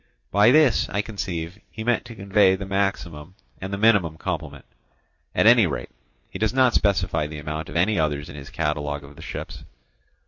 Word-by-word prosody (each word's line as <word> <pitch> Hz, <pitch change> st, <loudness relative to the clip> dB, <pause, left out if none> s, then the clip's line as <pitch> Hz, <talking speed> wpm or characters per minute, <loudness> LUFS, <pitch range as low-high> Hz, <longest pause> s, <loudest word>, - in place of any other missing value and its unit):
By 105 Hz, +3 st, +5 dB
this, 150 Hz, -4 st, +4 dB
I 100 Hz, +1 st, -1 dB
conceive, 95 Hz, -4 st, -5 dB
he 110 Hz, -, -7 dB
meant 120 Hz, +1 st, 0 dB
to 120 Hz, -1 st, -10 dB
convey 95 Hz, -1 st, +3 dB
the 95 Hz, +1 st, -6 dB
maximum 95 Hz, -4 st, -2 dB, 0.2 s
and 95 Hz, +1 st, -6 dB
the 100 Hz, -, -2 dB
minimum 100 Hz, -7 st, +3 dB
complement: 80 Hz, -4 st, -5 dB, 0.7 s
at -, -, +3 dB
any 115 Hz, -3 st, +7 dB
rate, 75 Hz, -, -5 dB, 0.4 s
he -, -, -8 dB
does 110 Hz, +2 st, 0 dB
not 130 Hz, -2 st, +4 dB
specify 95 Hz, -6 st, +1 dB
the 75 Hz, 0 st, -8 dB
amount 75 Hz, 0 st, -5 dB
of 75 Hz, -, -9 dB
any 90 Hz, +3 st, +2 dB
others 75 Hz, -2 st, -1 dB
in -, -, -10 dB
his 70 Hz, -1 st, -9 dB
catalogue 75 Hz, -2 st, -2 dB
of 70 Hz, 0 st, -13 dB
the -, -, -13 dB
ships. -, -, -7 dB
95 Hz, 185 wpm, -23 LUFS, 75-105 Hz, 0.7 s, any